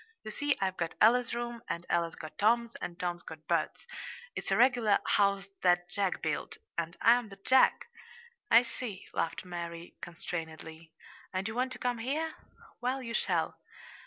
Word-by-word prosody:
You 215 - -6
see, 290 +5 0
I've 190 -1 0
got 170 -1 -2
Ella's 240 +2 +5
room, 240 -1 -4
and 170 +1 -3
Ella's 170 -1 +1
got 155 -1 -9
Tom's, 235 +2 +3
and 170 0 -5
Tom's 175 -1 -2
got 155 -2 -11
Bert's. 165 -2 0 0.5
It's - - -4
a - - +3
regular 240 -5 +5
'house 200 -2 +3 0.2
that 175 -1 +3
Jack 195 -2 0
built' 155 - -2 0.2
and 170 0 -3
I'm 235 -1 +5
the 195 - -10
'Jack'!" 255 +7 +4 0.6
"I 235 - +8
see," 230 -5 -6
laughed 165 - -1
Mary 170 -1 -6
constrainedly. 165 -1 -6 0.4
"And 190 +2 0
you 220 - -4
want 255 +2 0
to - - -8
come 245 -1 -1
here? 310 +7 -1 0.5
Well, 255 +2 -1
you 230 -1 -5
shall. - - 0
200 Hz, 165 wpm, -31 LUFS, 170-240 Hz, 0.6 s, I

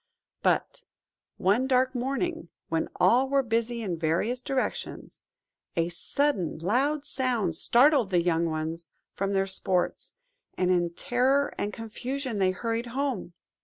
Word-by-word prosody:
But - - +1 0.6
one 210 +8 +2
dark 260 0 +3
morning, 275 +7 -2 0.2
when 165 0 0
all 245 +9 +4
were 275 0 +3
busy 230 0 -1
in 175 -5 -3
various 175 +10 0
directions, 265 0 -3 0.5
a 165 0 +1
sudden 185 - -1
loud 270 - +1
sound 245 - 0
startled 250 - +4
the 180 -2 +3
young 170 -1 +2
ones 160 +1 -4 0.2
from 195 +1 -1
their 195 0 +2
sports, 190 -1 -1 0.4
and 185 0 +2
in 175 -1 +2
terror 270 +2 +2
and 205 - -2
confusion 240 +2 -4
they 190 -1 +4
hurried 230 +5 -2
home. 255 -11 -2
230 Hz, 130 wpm, -27 LUFS, 180-260 Hz, 0.6 s, all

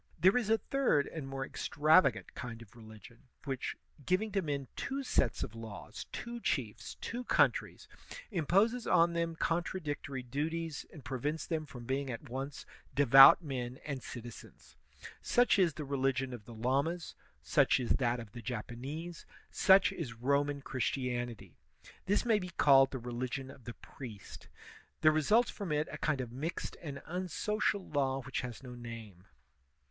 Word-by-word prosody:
There 190 +4 +5
is 240 -4 +1
a 225 - +5
third 250 - +1
and 155 -4 -6
more 135 0 -4
extravagant 150 -3 +3
kind 115 -2 -7
of 115 +1 -20
religion, 110 +2 -14 0.2
which, 135 -3 -3 0.3
giving 185 +7 +1
to 195 -1 +1
men 140 -5 -3
two 275 0 -3
sets 130 - +1
of - - -6
laws, 110 -2 -8
two 235 0 -5
chiefs, 120 - -2
two 245 +2 -4
countries, - - +2 0.4
imposes 200 - +2
on 170 +1 +4
them 170 -1 -1
contradictory 155 -6 -2
duties, 155 +5 -3
and 150 -7 -12
pre 130 -2 -3
vents 150 +5 -2
them 155 -2 -2
from 120 -4 -10
being 135 +2 -1
at 125 +4 -6
once 135 +2 -5 0.3
devout 135 +4 +9
men 130 -4 -4
and 140 -3 -4
citizens. 120 -1 -10 0.5
Such 245 -4 +3
is 170 -6 +3
the 150 - -5
religion 135 -1 0
of 110 -4 -9
the 120 - -10
Lamas, 140 +9 -1 0.3
such 70 - +3
is 120 -3 -2
that 120 -2 +1
of 115 -3 -9
the 120 - -8
Japanese, 130 +9 -6 0.2
such 190 0 +5
is 140 -9 -5
Roman 140 +3 0
Christianity. 120 - -3 0.5
This 205 +4 +2
may 225 -3 +4
be 180 -2 -6
called 135 -5 +5
the 135 - -4
religion 125 +2 -4
of 130 -4 -16
the 120 - -7
priest. 115 -7 -10 0.5
There 155 - +7
results 210 +11 +3
from 200 -6 -5
it 150 +1 +1
a - - -7
kind 150 -4 0
of 120 -2 -6
mixed 150 +8 -4
and 140 -4 -7
unsocial 185 +3 -1
law 135 -2 0
which 130 +2 -3
has 125 0 -7
no 125 -1 -8
name. 115 -6 -9
140 Hz, 160 wpm, -33 LUFS, 120-165 Hz, 0.5 s, devout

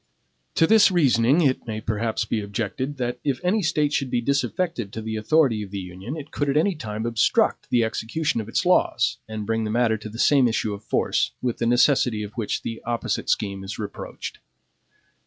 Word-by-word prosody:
To 165 - +5
this 220 +4 +6
reasoning 140 -4 +3
it 135 -5 +1
may 110 -1 -3
perhaps 110 +1 -1
be 110 - -1
objected, 115 +7 -3
that 125 -1 -2
if 140 -3 0
any 200 +5 +2
State 150 -4 +1
should 135 -3 0
be 120 - +1
disaffected 140 - -1
to 110 - -5
the 110 0 -3
authority 115 0 +2
of 100 - -6
the 100 - -5
Union, 95 - -6
it 150 -1 -9
could 145 -1 -1
at 140 - +2
any 190 +6 +3
time 110 -7 -5
obstruct 115 -2 +1
the 120 -1 +3
execution 115 +4 -1
of 110 - -9
its 145 - 0
laws, 180 - +2
and 110 -1 -5
bring 115 +1 0
the 110 - -2
matter 115 0 +2
to 110 0 -8
the 110 - -9
same 135 +1 +4
issue 110 -2 -1
of 100 +1 -8
force, - - 0
with 125 -2 -2
the 115 - +1
necessity 120 -3 +3
of 105 - -8
which 115 -4 -3
the 115 -1 -5
opposite 120 -3 -2
scheme 100 -2 -1
is 95 - -6
reproached. 105 -2 -7
115 Hz, 205 wpm, -24 LUFS, 110-145 Hz, -, this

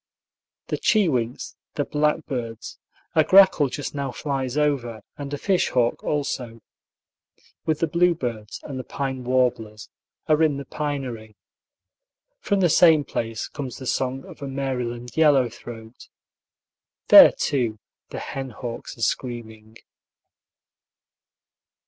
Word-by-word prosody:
The - - -2
chewinks, 135 - 0 0.2
the 145 - -1
blackbirds 145 -7 -2 0.3
(a 155 - +5
grackle 185 -4 +6
just 145 +2 -5
now 140 -2 -3
flies 135 -1 -3
over, 125 -8 -1
and 145 -1 -7
a 145 - -2
fish 185 +5 +1
hawk, 120 -2 0
also), 125 -6 -3 1.1
with 155 -1 0
the 165 - +2
bluebirds 150 -11 -1
and 135 -2 -6
the - - -5
pine 130 -2 -4
warblers, 120 -4 -1 0.4
are 155 0 +3
in 155 -3 +3
the 140 - -6
pinery. 130 -8 -5 1.0
From 200 - 0
the 180 - +5
same 160 -2 +6
place 115 -5 -4
comes 135 -5 -7
the 130 - -9
song 130 +1 -2
of - - -13
a 140 - -4
Maryland 125 -3 -4
yellow 145 -6 +4
throat. 115 0 -11 1.0
There, - - +10
too, 120 -6 -1 0.3
the - - -7
hen 135 -1 -5
hawks 120 0 -7
are 115 - -5
screaming. 110 -2 -4
130 Hz, 125 wpm, -24 LUFS, 120-150 Hz, 1.1 s, There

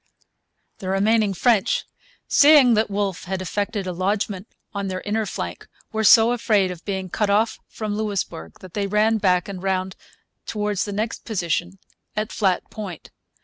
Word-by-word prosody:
The 185 - -5
remaining 205 +1 +2
French, 220 0 +2 0.4
seeing 285 -4 +7
that 215 0 +2
Wolfe 200 -2 -2
had 190 +1 -3
effected 200 +2 -2
a 185 - -3
lodgment 195 +2 -2 0.3
on 200 -1 -3
their 185 -1 -3
inner 215 +1 -1
flank, - - -5 0.2
were 220 0 -1
so 225 +2 +7
afraid 210 -6 +2
of 180 -1 -9
being 190 -2 -3
cut 205 +3 -1
off 215 +3 +2
from 215 -2 -4
Louisbourg 200 - -3
that 185 - -12
they 200 -1 -1
ran 215 +2 +2
back 180 -3 +2
and 195 -3 -6
round 190 -1 -1 0.5
towards 210 -3 -1
the 205 - -5
next 215 +3 -3
position 175 -3 -2 0.4
at 215 +1 -2
Flat 190 -4 +1
Point. 195 -7 -8
200 Hz, 160 wpm, -23 LUFS, 185-215 Hz, 0.5 s, seeing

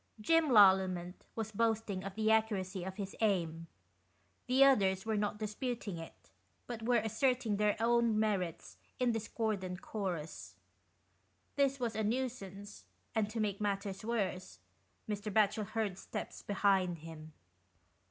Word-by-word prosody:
Jim 325 +8 +3
Lallement 190 -5 +5 0.2
was 220 -1 -3
boasting 220 -3 0
of 195 0 -6
the 220 - -3
61 220 0 +6
accuracy 190 -4 -4
of 190 +1 -5
his 195 -1 -5
aim: 165 -6 0 0.8
the 260 +2 +5
others 195 -8 +4
were 220 -1 0
not 210 0 -1
dis 210 -1 -4
puting 230 -7 -3
it, 165 - -12 0.3
but 235 -2 -6
were 240 +2 +2
asserting 225 0 +1
their 210 0 +2
own 235 -1 +3
merits 190 -6 -1 0.2
in 250 -1 +3
discordant 215 -4 -3
chorus. 180 -7 -5 1.0
This 275 -1 +2
was 235 -3 -2
a 220 - 0
nuisance, 205 -4 -4 0.3
and 220 -3 +1
to 225 +1 -4
make 205 -2 -1
matters 200 -1 -2
worse, 205 -5 -2 0.5
Mr. 210 0 -3
Batchel 210 0 +2
heard 215 -4 -2
steps - - -6
behind 190 -3 +2
him. 155 -1 -10
210 Hz, 140 wpm, -34 LUFS, 190-225 Hz, 1.0 s, 61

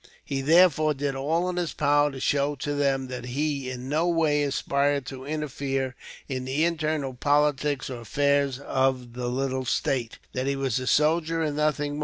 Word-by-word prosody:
He 135 -1 -2
therefore 155 0 +4
did 140 0 -2
all 160 +6 0
in 180 -1 -3
his 175 -2 -1
power 145 0 +3
to 135 -2 -8
show 140 +2 +1
to 145 +2 -3
them 135 -2 +1
that 125 -1 -6
he, 140 +1 -2
in 125 0 -6
no 155 +5 +1
way, 160 -4 +2
aspired 140 0 0
to 130 0 -8
interfere 140 -3 -2 0.3
in 130 -2 -3
the 140 +5 +1
internal 155 -5 -1
politics 145 +1 +1
or 125 -3 -6
affairs 140 +3 +1
of 130 -3 -1
the 125 0 -4
little 130 +1 -1
state 120 -2 -1 0.2
that 130 +1 -2
he 140 - +1
was 135 -3 0
a 130 - -5
soldier 165 +3 +2
and 150 -2 -1
nothing 150 -1 0
more. 145 - -5
140 Hz, 185 wpm, -26 LUFS, 130-150 Hz, 0.3 s, therefore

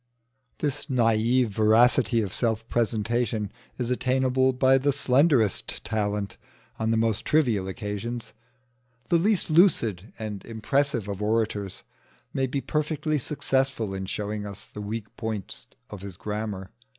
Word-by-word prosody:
This 145 0 -2
naïve 120 -1 +3
veracity 115 +3 +4
of 100 -3 -3
self 115 -2 0
presentation 115 -2 0 0.3
is 125 -1 -2
attainable 130 +1 +2
by 130 +1 +4
the 145 +2 +2
slenderest 130 - +2
talent 105 -3 -2 0.4
on 110 0 0
the 115 - +2
most 110 -2 +1
trivial 120 -11 +2
occasions. 105 +4 -5 0.8
The 170 - +4
least 200 -2 +2
lucid 115 - +3
and 105 -3 -5
impressive 115 0 0
of 100 0 -4
orators 105 -2 -1 0.5
may 135 -1 +1
be 135 +2 -2
perfectly 150 0 -1
successful 130 -6 -1
in 95 0 -4
showing 105 +1 -3
us 100 -1 -8
the 105 - -9
weak 110 +1 -5
points 110 -4 -4 0.2
of 100 - -7
his 95 -3 -8
grammar. 105 -3 -4
115 Hz, 130 wpm, -26 LUFS, 105-130 Hz, 0.8 s, veracity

